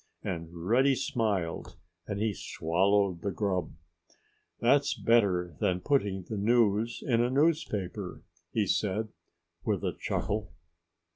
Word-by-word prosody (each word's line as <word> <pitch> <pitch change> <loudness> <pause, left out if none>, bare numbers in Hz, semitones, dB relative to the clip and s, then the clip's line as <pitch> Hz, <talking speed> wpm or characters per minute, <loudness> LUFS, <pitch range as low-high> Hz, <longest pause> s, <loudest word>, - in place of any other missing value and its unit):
And 85 -1 -5
Reddy 130 +5 +4
smiled 105 -10 -2 0.3
as 100 - -3
he 110 0 0
swallowed 95 +2 +1
the 100 - -1
grub. 95 -4 -1 0.9
"That's 140 +4 +3
better 90 -8 +2
than 90 -1 +1
putting 100 -4 0
the 110 - -5
news 115 +1 +2
in 120 -3 +3
a 120 - +2
newspaper," 110 - 0 0.3
he 110 -2 +1
said 105 +4 0 0.5
with - - -1
a - - 0
chuckle. 100 -6 -3
105 Hz, 120 wpm, -29 LUFS, 90-115 Hz, 0.9 s, Reddy